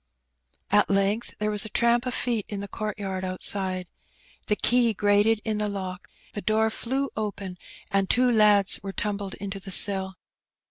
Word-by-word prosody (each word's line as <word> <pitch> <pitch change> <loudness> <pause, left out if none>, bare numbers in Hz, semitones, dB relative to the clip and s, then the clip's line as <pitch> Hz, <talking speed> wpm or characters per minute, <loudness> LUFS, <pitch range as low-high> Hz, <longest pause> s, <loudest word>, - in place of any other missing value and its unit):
At 205 +1 +4
length 200 +3 0
there 210 0 -1
was 210 -1 +4
a 220 - -5
tramp 235 +3 +2
of 250 - -2
feet 235 -4 -1
in 205 - -4
the 200 - -6
court 215 +1 -5
yard 190 -2 -4
outside. 185 0 -1 0.6
The 210 - +2
key 235 0 +2
grated 205 +2 +3
in 215 -2 -1
the 210 0 -1
lock, 185 -2 -6 0.2
the 205 - -4
door 220 +2 +1
flew 265 +5 -2
open, 200 -4 -5 0.3
and 195 -1 +1
two 250 0 +3
lads 210 -3 +4
were 195 -1 -6
tumbled 200 -1 -3
into 195 0 -6
the 195 - -10
cell. 190 0 +3
205 Hz, 175 wpm, -25 LUFS, 195-220 Hz, 0.6 s, At